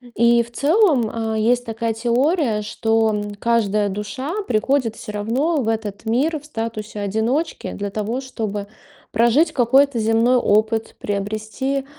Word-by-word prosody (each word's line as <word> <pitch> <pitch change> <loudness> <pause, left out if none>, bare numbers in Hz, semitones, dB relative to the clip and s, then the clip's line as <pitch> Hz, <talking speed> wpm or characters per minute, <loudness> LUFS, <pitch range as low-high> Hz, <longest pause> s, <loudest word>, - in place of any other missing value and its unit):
И 235 0 +4
в 235 - -15
целом, 290 - +3 0.3
э, - - 0
есть 245 +3 +2
такая 225 0 -2
теория, 240 - +1
что, 225 +1 +1
м, 205 -1 -3
каждая 210 -2 +1
душа 210 - -4 0.2
приходит 230 +1 +1
всё - - -8
равно 250 +11 0
в 225 - -4
этот 220 -2 -3
мир 280 +8 +1
в 295 - -18
статусе 225 -6 -5
одиночки 220 +10 -1
для 205 0 -4
того, 215 +5 -3
чтобы 210 -6 -4 0.4
прожить 240 +9 +3
какой-то 265 +1 +3
земной 225 +3 +3
опыт, 220 0 +1
приобрести, 215 +7 -3
225 Hz, 140 wpm, -21 LUFS, 215-260 Hz, 0.4 s, И